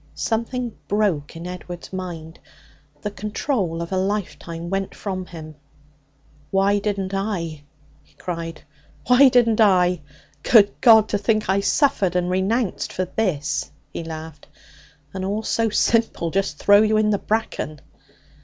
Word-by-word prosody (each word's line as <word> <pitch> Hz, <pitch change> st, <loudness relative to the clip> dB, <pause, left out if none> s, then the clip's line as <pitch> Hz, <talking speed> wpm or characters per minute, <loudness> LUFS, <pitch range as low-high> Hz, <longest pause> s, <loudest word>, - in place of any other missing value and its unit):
Something 235 Hz, +1 st, -2 dB
broke 195 Hz, -9 st, 0 dB
in 165 Hz, +1 st, -8 dB
Edward's 180 Hz, 0 st, -8 dB
mind. 170 Hz, -3 st, -6 dB, 0.6 s
The 210 Hz, -, -2 dB
control 205 Hz, -, -2 dB
of 170 Hz, -, -9 dB
a 190 Hz, -, 0 dB
life 195 Hz, +1 st, -2 dB
time 170 Hz, +1 st, -7 dB
went 195 Hz, 0 st, -2 dB
from 185 Hz, -3 st, -5 dB
him. 155 Hz, -2 st, -9 dB, 1.0 s
'Why 195 Hz, +1 st, +2 dB
didn't 200 Hz, -2 st, -2 dB
I?' 180 Hz, -6 st, -3 dB, 0.4 s
he -, -, -30 dB
cried. 165 Hz, -2 st, -6 dB, 0.4 s
'Why 255 Hz, +3 st, +7 dB
didn't 235 Hz, -3 st, +3 dB
I? 180 Hz, -4 st, +4 dB, 0.4 s
Good 205 Hz, +1 st, +5 dB
God! 220 Hz, -3 st, +7 dB
To 205 Hz, -, 0 dB
think 215 Hz, -1 st, 0 dB
I 195 Hz, +1 st, +3 dB
suffered 200 Hz, -, +2 dB
and 180 Hz, 0 st, 0 dB
renounced 195 Hz, +4 st, 0 dB
for 185 Hz, -, -2 dB
this!' 150 Hz, -7 st, -1 dB, 0.2 s
He -, -, -4 dB
laughed. 160 Hz, -2 st, -8 dB, 0.7 s
'And 190 Hz, -1 st, -4 dB
all 205 Hz, +3 st, -2 dB
so 225 Hz, +1 st, +1 dB
simple! 220 Hz, -6 st, +1 dB
Just 195 Hz, -5 st, -1 dB
throw 205 Hz, +5 st, +6 dB
you 215 Hz, 0 st, +3 dB
in 215 Hz, 0 st, +2 dB
the 205 Hz, -, +1 dB
bracken.' 210 Hz, -8 st, -2 dB
195 Hz, 145 wpm, -22 LUFS, 170-215 Hz, 1.0 s, Why